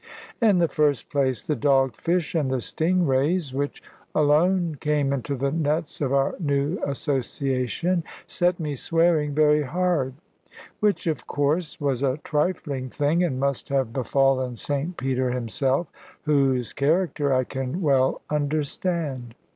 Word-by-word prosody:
In 210 -5 +5
the 170 -1 +3
first 145 -2 0
place, 130 -4 0
the 150 - 0
dog 135 -3 +2
fish 170 -2 -1
and 155 -6 +1
the 130 -1 0
sting 175 +8 0
rays 140 +2 +1
(which 140 +1 -3 0.3
alone 165 +4 +3
came 150 -2 +1
into 140 +1 -2
the 135 +1 -1
nets 155 0 -1
of 135 -3 0
our 140 0 +2
new 145 +2 0
association) 140 - -1 0.2
set 175 0 0
me 150 -3 -2
swearing 160 0 +1
very 150 0 +4
hard; 150 -3 0 0.6
which, 205 -5 +1
of 160 -2 -2
course, 150 +3 -1
was 135 -3 -1
a 135 -1 +1
trifling 150 -4 -1
thing, 150 +6 +1
and 135 -7 -1
must 140 +1 -1
have 135 -4 0
befallen 130 -1 +1
St 145 +8 -3
Peter 130 -1 0
himself, 130 +5 0 0.4
whose 135 -5 +1
character 150 -1 +1
I 130 -1 +3
can 130 +5 -4
well 135 -3 +2
understand. 145 -3 -2
145 Hz, 140 wpm, -24 LUFS, 135-160 Hz, 0.6 s, In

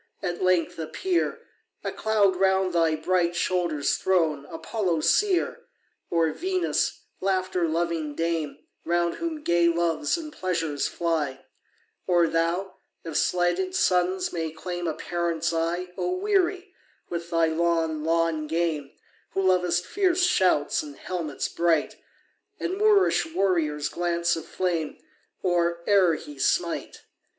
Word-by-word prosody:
at 175 -2 -3
length 185 -3 +1
appear, 170 - -1 0.4
A - - -2
cloud 210 -3 +2
round 190 0 +2
thy 165 -2 +3
bright 175 +2 +1
shoulders 175 -5 0
thrown, 160 -6 +1
Apollo 180 -2 -2
seer! 380 - +2 0.4
Or 165 -2 +2
Venus, 370 - -1 0.2
laughter 185 -2 0
loving 165 -2 -1
dame, 165 -4 -1 0.3
Round 170 0 0
whom 325 -3 -4
gay 170 -5 +3
Loves 170 - +1
and 310 -2 -7
Pleasures 165 - -1
fly; 155 -6 -2 0.6
Or 175 -2 +4
thou, 170 +4 -1 0.3
if 165 -2 -6
slighted 180 +1 +1
sons 180 0 +1
may 165 -2 -2
claim 175 +2 -5
A 160 - -1
parent's 170 -1 -1
eye, 170 +2 -1
O 360 - 0
weary 380 -1 0 0.4
with 170 0 -4
thy 165 -1 +3
long, 160 -1 0
long 165 -1 +1
game, 160 -3 -1 0.4
Who 195 - +1
lov'st 180 -1 +2
fierce 370 - +1
shouts 185 - +3
and 145 -2 -9
helmets 165 -5 -3
bright, 170 -3 +1 0.6
And 370 - -2
Moorish 415 -5 +4
warrior's 160 -7 +1
glance 170 -1 0
of 165 - -7
flame 170 -4 -2 0.5
Or 170 -2 +1
e'er 190 -5 +5
he 145 -2 -10
smite! 170 +4 -1
170 Hz, 125 wpm, -26 LUFS, 165-185 Hz, 0.6 s, e'er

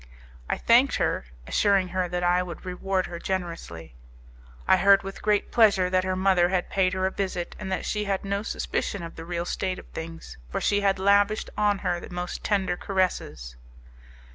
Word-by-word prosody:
I - - 0
thanked 245 +4 +4
her, - - 0 0.2
assuring 195 - +2
her 185 0 -1
that 180 0 -2
I 175 +1 +3
would 180 0 -7
reward 185 +1 -1
her 170 - -7
generously. 165 - -5 0.7
I 190 - +6
heard 195 +2 +5
with 195 0 -7
great 210 -1 +1
pleasure 200 -5 +4
that 185 0 +2
her 185 0 -1
mother 185 -2 +3
had 185 -1 -1
paid 185 -1 +2
her 190 0 0
a 190 - 0
visit, 185 -3 -3
and 190 -2 -5
that 190 - -2
she 210 -1 -1
had 195 -1 -2
no 200 0 -1
suspicion 200 -3 -3
of 165 - -8
the 165 - -8
real 170 0 -3
state 185 +1 -2
of - - -10
things, 165 - -8
for - - -2
she 205 0 +1
had 195 -1 +2
lavished 200 +2 +2
on 210 -1 +2
her 175 -1 +1
the - - -10
most 180 0 -5
tender 195 -3 +1
caresses. 180 - -2
185 Hz, 190 wpm, -26 LUFS, 175-200 Hz, 0.7 s, I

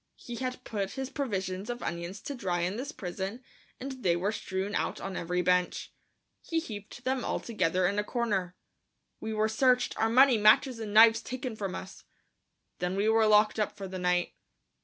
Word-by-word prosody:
He 240 -1 -8
had 255 0 -4
put 200 -3 -3
his 265 -1 -5
provision 195 -6 -3
of 240 0 -4
onions 170 +3 -4
to 285 - -5
dry 180 -9 -2
in 180 +3 -1
this 265 +6 -4
prison 195 - -5 0.4
and 260 0 -6
they 175 -5 +3
were 190 +4 0
strewn 195 -1 -3
out - - -1
on 195 -1 -5
every 180 +1 -1
bench. 180 0 +1 0.5
He 330 - -1
heaped 215 -4 -8
them 260 -1 0
all - - -1
together 185 -5 0
in 200 +3 +1
a - - +1
corner. 205 -7 -1 0.6
We 220 - -4
were 215 0 +1
searched, 250 +3 +2
our 225 - +3
money, 255 0 +6
matches 230 +4 +5
and 215 -2 -5
knives 225 +1 +7
taken 255 -2 -5
from 195 -3 -4
us. 190 - -9 0.8
Then 180 +1 -1
we 205 +2 +2
were 220 0 +4
locked 215 +1 +4
up 210 - -1
for 195 -2 -5
the 185 0 -6
night. 180 0 +1
210 Hz, 190 wpm, -29 LUFS, 185-240 Hz, 0.8 s, knives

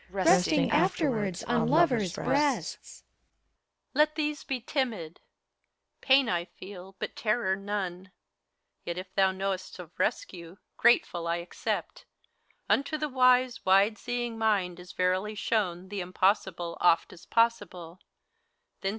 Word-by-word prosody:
Resting 190 - +3
afterwards 215 - 0
on - - +1
lovers' 250 - +3
breasts. 285 -1 -1
HELENA. - - -49
Let 305 0 +4
these 300 -1 -2
be 265 -3 -3
timid 225 - -3
I - - -40 0.8
Pain 265 -1 +6
I 175 -4 -1
feel, 190 +1 -12
but - - -5
terror 215 -3 0
none; 195 -2 -5 0.7
Yet 170 0 -5
if 185 0 -8
thou 190 -1 +3
know'st 190 0 -4
of - - -10
rescue, 175 - -3 0.2
grateful 175 -7 +2
I 170 - +1
accept! 175 +1 -4 0.6
Unto 280 +3 +1
the 300 0 -2
wise, 255 -1 +3
wide 195 +3 +3
seeing 240 -2 -3
mind 195 -5 0
is 180 +1 -11
verily 185 +4 0
shown 190 -5 -1
The 200 -1 -4
Impossible 180 -1 0
oft 165 -2 +3
as 175 - -16
possible. 190 -7 0
195 Hz, 125 wpm, -28 LUFS, 180-245 Hz, 0.8 s, Pain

